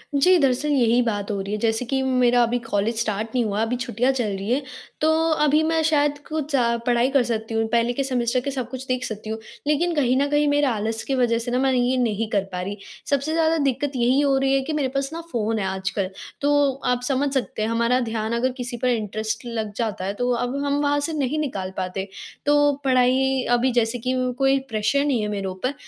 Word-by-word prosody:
जी, 360 +6 +5
दरअसल 275 0 +1
यही 245 -4 +3
बात 205 -4 -2
हो 200 - -2
रही 195 +1 -5
है - - 0
जैसे 225 +2 0
कि 265 +2 -1
मेरा 250 -2 +3
अभी 235 +1 +1
कॉलेज 225 -1 -1
स्टार्ट 215 -1 -1
नहीं 245 - +3
हुआ, 210 0 -1
अभी 225 +2 0
छुट्टियाँ 245 +1 0
चल 245 -5 -1
रही 195 +3 -5
हैं 275 +3 +1 0.4
तो 310 - +3 0.3
अभी 300 +1 +4
मैं 320 0 +1
शायद 295 -2 +2
कुछ 310 -2 -2
अ, 235 -2 +2
पढ़ाई 245 0 +2
कर 275 -2 +3
सकती 225 -1 -3
हूँ, 225 0 +1
पहले 235 +1 +1
के 275 - -1
सेमेस्टर 255 -2 0
के - - 0
सब 255 -3 -3
कुछ 260 0 -7
देख 255 0 -1
सकती 215 0 -6
हूँ। 220 0 -3 0.3
लेकिन 335 +4 +2
कहीं 260 -3 +2
न 280 - +2
कहीं 295 0 +2
मेरा 290 -2 +2
आलस 220 +1 -2
की 270 - -1
वज़ह 240 -3 +2
से 240 +1 -4
ना 250 - +1
मैं 265 0 +2
ये 250 0 +2
नहीं 225 -3 0
कर 200 -3 +1
पा 180 -1 -3
रही, 200 +3 -5 0.3
सबसे 280 +2 0
ज़्यादा 325 0 +2
दिक्कत 270 +2 -1
यही 250 +2 +3
हो 275 -2 +3
रही 270 0 +2
है 270 - +3
कि 310 +4 -4
मेरे 290 -3 0
पास 275 0 0
ना 335 - -5
फ़ोन 225 -1 -1
है 195 - -1
आजकल, 190 0 -2 0.3
तो 285 -1 +3
आप 250 0 +1
समझ 275 0 0
सकते 260 -5 -2
हैं 215 - 0
हमारा 235 +2 +2
ध्यान 220 0 -2
अगर 255 +2 +1
किसी 245 -1 -4
पर 255 - +3
इंटरेस्ट 220 0 -2
लग 225 -3 -3
जाता 210 -4 -2
है 195 - -2
तो 245 +4 -1
अब 245 +2 -1
हम 285 0 +1
वहाँ 290 0 +2
से 325 - -4
नहीं 295 0 -1
निकाल 195 -11 -3
पाते। 190 +1 -3 0.4
तो 290 0 +4
पढ़ाई 260 0 +3
अभी 245 +2 +3
जैसे 240 0 0
कि 255 +3 -1 0.2
कोई 270 0 +3
प्रेशर 225 +6 +1
नहीं 260 -6 +1
है 210 - -1
मेरे 200 -2 -3
ऊपर 190 +9 -3
245 Hz, 235 wpm, -23 LUFS, 225-275 Hz, 0.4 s, जी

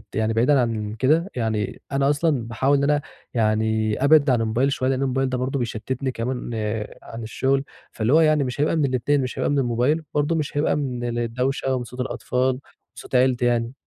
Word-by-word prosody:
يعني 110 0 +1
بعيدًا 130 +5 +3
عن 110 -2 -2
كده، 160 +8 +2
يعني 110 -4 -2
أنا 135 0 +2
أصلًا 145 -5 +1
باحاول 135 +5 +2
إن 140 - 0
أنا 145 0 +2 0.3
يعني 110 +1 +1
أبعَد 145 -1 +5
عن 120 -3 +3
الموبايل 120 +5 +1
شوية، 130 0 0
لإن 135 0 0
الموبايل 135 0 0
ده 130 - -1
برضه 130 +2 -2
بيشتِّتني 125 +3 -3
كمان 125 +1 -4 0.5
عن 115 0 -8
الشغل، 135 +4 0 0.3
فاللي 115 +5 0
هو 165 - +6
يعني 155 -2 +3
مش 130 +2 -3
هيبقى 155 - +2
من 150 -3 +2
الاتنين، 130 +2 +1
مش 125 - -4
هيبقى - - +1
من 145 - +2
الموبايل 125 +6 +1
وبرضه 150 +3 +1
مش 150 -2 -3
هيبقى 150 - +2
من 120 -4 -3
الدَوشة، 125 +3 -1
ومن 125 - -2
صوت 125 +2 -11
الأطفال 125 0 -1
ومن 130 0 -2 0.4
صوت - - -7
عيلتي 125 -1 +3
يعني. 120 0 +1
130 Hz, 200 wpm, -23 LUFS, 115-140 Hz, 0.5 s, هو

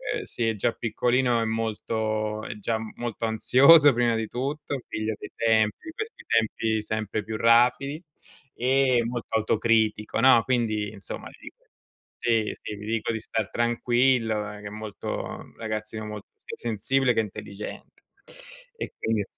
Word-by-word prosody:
uhm, - - -3
sì 115 - -2
è 110 - +1
già 105 - +1
piccolino, 120 +1 +1
è - - 0
molto 110 -1 -2
è - - -5
già 110 +2 -1 0.2
molto 120 -1 -3
ansioso 140 +7 +7
prima 120 -1 +2
di 110 0 -2
tutto, 140 +3 -3
figlio 110 0 -3
dei - - -9
tempi, 110 -2 +3
di 320 - -7
questi 435 +5 -7
tempi 110 -1 +1
sempre 110 0 -3
più 110 +1 -5
rapidi, 125 +6 +3 0.5
e 130 0 +3
molto 120 0 -4
autocritico, 110 -1 +1
no? 125 -3 +7
Quindi 110 -5 0
insomma, 100 -2 -8
ti - - -18
dico - - -13 0.5
sì, 115 -2 +1
sì, 105 - -6
gli 105 - -9
dico 115 +1 -1
di 110 - -3
star 110 -1 -3
tranquillo, 120 -1 +2 0.2
che 105 - -7
è - - -5
molto 105 0 -6
ragazzino 110 0 -4
molto 105 -1 -7 0.2
più - - -6
sensibile 125 +4 +1
che - - +1
intelligente, 105 -1 -8 0.7
e 450 - -5
quindi 110 -2 0
115 Hz, 150 wpm, -26 LUFS, 110-120 Hz, 0.7 s, ansioso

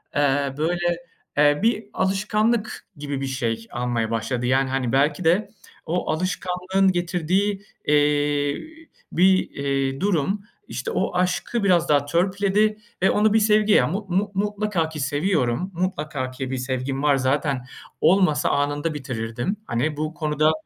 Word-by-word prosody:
eee, 140 -1 +2
böyle, 175 +2 0 0.4
eee, 145 0 +4
bir 225 -1 +2
alışkanlık 210 +4 0
gibi 140 -1 -4
bir 135 - -2
şey 115 -3 -2
almaya 120 -2 -1
başladı. 120 +2 -2
Yani, 130 +1 +2
hani, 130 -3 -1
belki 145 +5 +2
de 180 +6 +2 0.4
o 175 -1 -1
alışkanlığın 185 +2 0
getirdiği, 180 +3 0 0.2
eee, 145 -1 +2 0.5
bir, 185 +2 +3
eee, 135 0 -1
durum, 195 +1 +1 0.3
işte 470 - -4
o - - -1
aşkı 185 +5 0
biraz 175 -4 +3
daha 145 -1 +3
törpüledi 200 +6 +1 0.2
ve 190 - +4
onu 210 0 +3
bir 220 - +5
sevgi 210 0 +4
ya 125 - +5
mu 200 +5 -3
mu 200 +3 0
mutlaka 205 -4 0
ki 155 -1 -7
seviyorum, 145 +2 0
mutlaka 155 -7 -2
ki 130 0 -5
bir 130 - -2
sevgim 130 +2 -3
var. 145 -2 +4
Zaten 135 0 0 0.4
olmasa 180 -5 +3
anında 145 +2 0
bitirirdim. 125 - -3
Hani, 145 +6 -1
bu 155 +1 -2
konuda, 155 -1 +1
155 Hz, 140 wpm, -23 LUFS, 135-190 Hz, 0.5 s, bir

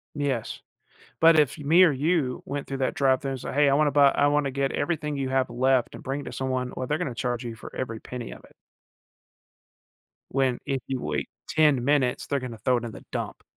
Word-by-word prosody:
Yes. 140 -6 -2 0.6
But, 165 0 +6
if 150 +1 +2
me 165 +6 +5
or 165 - +6
you 145 -2 0
went 145 0 -4
through 135 - -4
that 130 - 0
drive-thru 135 0 +1
and 130 - -4
say, - - -5
"Hey, 145 0 +4
I - - +3
wanna 145 0 +3
buy 140 -1 +6
I 145 - +2
wanna 145 -2 +1
get 135 0 -1
everything 150 -1 -2
you 135 -1 -2
have 130 -1 +1
left 130 0 +1
and - - -11
bring 135 +2 -3
it - - -9
to - - -6
someone," 130 -1 -2
well, 130 - -4
they're 150 - 0
gonna 125 - -3
charge 120 0 -2
you 115 -1 -5
for - - -11
every 115 -4 -4
penny 125 -3 -7
of - - -11
it. - - -22 1.8
When 130 -2 +1
if 135 -3 -2
you 130 -2 -3
wait - - -3 0.2
10 150 -6 +3
minutes, 135 -3 +1
they're 140 -2 -1
gonna 120 -3 -7
throw 125 +2 +2
it 120 - -6
in 115 - -6
the - - -11
dump. - - -4
135 Hz, 225 wpm, -26 LUFS, 125-145 Hz, 1.8 s, But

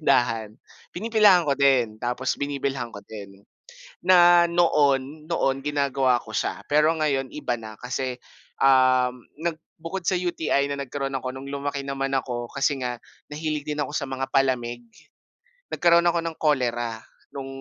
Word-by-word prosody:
tindahan 115 -7 +1 0.4
pinipilahan 210 -2 +4
ko 145 - +1
din 125 -6 +3
tapos 125 +2 -2
binibilhan 140 -3 -2
ko 100 - -9
din. 100 -2 -11 0.6
Na 175 -1 +6
noon 150 -3 +1
noon 135 -4 0
ginagawa 140 -3 +1
ko 110 - -11
siya - - -2
pero 150 +2 +3
ngayon 140 -4 0
iba 150 -5 -3
na 110 -1 -9
kasi, 130 0 -3 0.4
um, 130 -2 +4 0.2
nag 165 +1 -1 0.2
bukod 170 +4 -5
sa 185 - +2
UTI 165 -5 0
na 140 - -4
nagkaroon 135 0 -4
ako, 130 -1 -4
no'ng 135 +1 -8
lumaki 140 0 -3
naman 135 0 -2
ako 120 -2 -5
kasi 140 0 0
nga 125 -1 -3 0.3
nahilig 155 0 -3
din 150 0 -3
ako - - -8
sa 140 -3 -2
mga 135 0 -3
palamig. 120 -3 0 0.9
Nagkaroon 170 0 +4
ako 170 0 0
ng 165 -1 -4
cholera 120 -6 0 0.3
nung 135 -1 -6
135 Hz, 150 wpm, -24 LUFS, 125-155 Hz, 0.9 s, Na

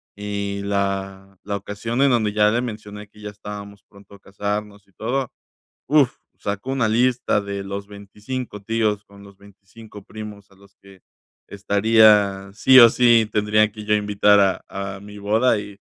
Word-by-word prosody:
y 100 -1 -4
la 100 -1 -3
la 100 0 -3
ocasión 105 +5 -4
en 140 - +5
donde 110 -4 +1
ya 105 0 +4
le 120 +2 0
mencioné 105 -3 -8
que 105 +1 -21
ya 105 - -6
estábamos 100 0 -10
pronto 100 0 -19
a - - -18
casarnos 105 +1 -5
y 95 - -31
todo, 125 +5 -3 0.6
uf, 145 -3 +3 0.2
sacó 100 +6 -4
una 135 -5 +1
lista 125 0 +1
de 100 -1 -5
los 100 +1 -6
25 105 +3 -8
tíos 110 -1 -1
con 100 0 -17
los 100 -1 -16
25 100 +1 -15
primos 105 -2 -10
a - - -21
los 100 +1 -22
que 100 -1 -18 0.5
estaría 100 -1 +3
sí 130 +5 +5
o 120 -1 +9
sí, 115 -2 +3
tendría 105 0 +2
que 105 0 -10
yo 105 0 +2
invitar 105 0 +3
a 95 0 -1
a - - -13
mi 105 0 -12
boda. 110 +3 +2
Y 100 -1 -10
105 Hz, 170 wpm, -21 LUFS, 100-110 Hz, 0.6 s, o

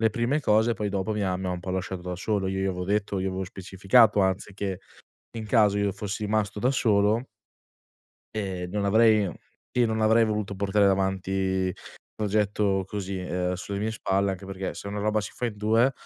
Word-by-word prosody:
le 110 - +4
prime 120 +7 0
cose, 110 -2 +3
poi 105 0 -2
dopo 100 +1 -2
mi 105 -1 -1
ha 90 -1 0
mi 95 0 -4
ha - - -1
un 90 - -3
po' 90 +2 -6
lasciato 95 0 -3
da 90 0 -4
solo. 100 +1 -1
Io 95 0 -2
gli - - 0
avevo 90 -1 -2
detto, 100 0 0
io 95 - -1
avevo 95 +1 -3
specificato 95 +4 +3
anzi 95 +1 0
che 95 -2 -3 0.6
in 110 -1 -5
caso 105 -2 +4
io 100 -1 +1
fossi 105 +2 -4
rimasto 105 -1 -1
da 125 - +2
solo 110 -3 +2 1.1
ehm, 95 -4 -3
non 100 0 -1
avrei 110 -1 +4 0.5
io 120 -1 +4
non 110 0 -1
avrei 110 +1 +5
voluto 105 -2 -2
portare 100 +1 +2
avanti 95 -1 0
un 95 -1 0 0.4
progetto 105 -2 +1
così, 100 -1 -4
uhm, 90 0 -2
sulle 100 +2 -4
mie 110 +2 -1
spalle, 100 -2 0
anche 95 +1 -7
perché 95 0 -4
se - - -7
una 105 +1 -4
roba 110 +1 +1
si 95 - -6
fa 125 - -3
in 110 -3 -4
2, 115 +5 +3
100 Hz, 205 wpm, -26 LUFS, 95-110 Hz, 1.1 s, avrei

